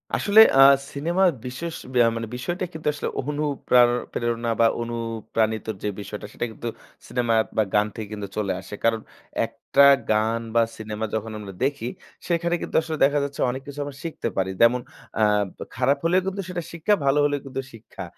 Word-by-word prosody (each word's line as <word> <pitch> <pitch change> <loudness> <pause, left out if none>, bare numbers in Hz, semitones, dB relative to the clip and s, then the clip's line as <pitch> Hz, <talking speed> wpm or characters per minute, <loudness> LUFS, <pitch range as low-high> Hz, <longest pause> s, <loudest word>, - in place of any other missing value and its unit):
আসলে 210 +1 +4 0.2
আ - - +8 0.3
সিনেমা 170 +7 0 0.2
বিশেষ 160 +7 -5 0.2
বেয়া 120 -2 +5
মানে 115 -1 -4
বিষয়টা 175 +9 -3
কিন্তু 155 -1 -6
আসলে 145 - -3
অনুপ্রার 140 -4 +2 0.2
প্রেরণা 120 0 -1
বা 115 - +6 0.2
অনুপ্রাণিতর 115 -2 -2
যে - - 0
বিষয়টা 105 +1 -7
সেটা - - -2
কিন্তু 120 - -7 0.4
সিনেমা 120 -1 0 0.2
বা 110 - +5
গান 105 0 +3
থেকে 110 -2 -5
কিন্তু 105 -1 -5
চলে 105 -2 0
আসে। - - -12
কারণ 115 -1 +2 0.4
একটা 135 +4 +2 0.3
গান 110 +2 +1
বা 115 - +6 0.2
সিনেমা 110 0 -4
যখন 110 +1 -3
আমরা 100 -2 -8
দেখি 135 -3 -1 0.4
সেখানে 170 0 +1
কিন্তু - - -6
আসলে 160 -1 -4
দেখা 145 +1 +2
যাচ্ছে 140 0 -4
অনেক 130 +2 -4
কিছু 145 0 -8
আমরা 140 -1 -7
শিখতে 165 -7 -4
পারি। 95 0 +1
যেমন 120 +2 +5 0.4
আ - - +2 0.5
খারাপ 135 +3 +2
হলেও 180 +3 +4
কিন্তু 195 +1 -2
সেটা 175 -2 -3
শিক্ষা, 170 +5 +1
ভালো 135 +2 +3
হলেও 145 0 0
কিন্তু 135 0 -4
শিক্ষা। 115 - -10
125 Hz, 175 wpm, -24 LUFS, 115-150 Hz, 0.5 s, আ